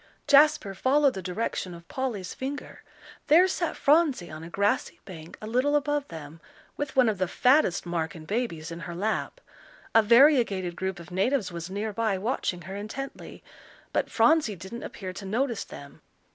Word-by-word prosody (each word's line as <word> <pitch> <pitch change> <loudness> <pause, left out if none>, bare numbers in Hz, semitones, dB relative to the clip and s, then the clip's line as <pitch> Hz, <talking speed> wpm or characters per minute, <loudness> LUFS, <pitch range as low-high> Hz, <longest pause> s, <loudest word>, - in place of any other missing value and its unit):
Jasper 285 -8 +5
followed 270 +7 +3
the 190 - -5
direction 180 -1 -3
of 170 0 -14
Polly's 230 -8 -4
finger. 275 +2 -6 0.5
There 345 +5 +6
sat 350 -3 -2
Phronsie 285 - +2
on 155 +1 -8
a 165 - -8
grassy 200 +3 0
bank 165 -4 -10
a - - -8
little 255 +6 +1
above 290 0 0
them, 160 0 -10 0.3
with 290 -2 -4
one 255 -2 +5
of 210 -4 0
the 185 - +1
fattest 250 - +3
Marken 165 -1 -3
babies 170 -7 -3
in 165 - -6
her 170 0 -7
lap. 215 - -2 0.5
A 225 - +7
variegated 230 - +4
group 190 0 -3
of 170 +1 -12
natives 195 +2 0
was 170 0 -6
near 205 +2 -3
by, 215 -2 0
watching 190 -4 -2
her 190 +4 -7
intently. 220 +7 -7 0.5
But - - 0
Phronsie 240 -2 +3
didn't 190 +7 -8
appear 185 -2 -7
to 195 - -8
notice 230 +4 -1
them. 140 0 -12
210 Hz, 170 wpm, -27 LUFS, 180-265 Hz, 0.5 s, A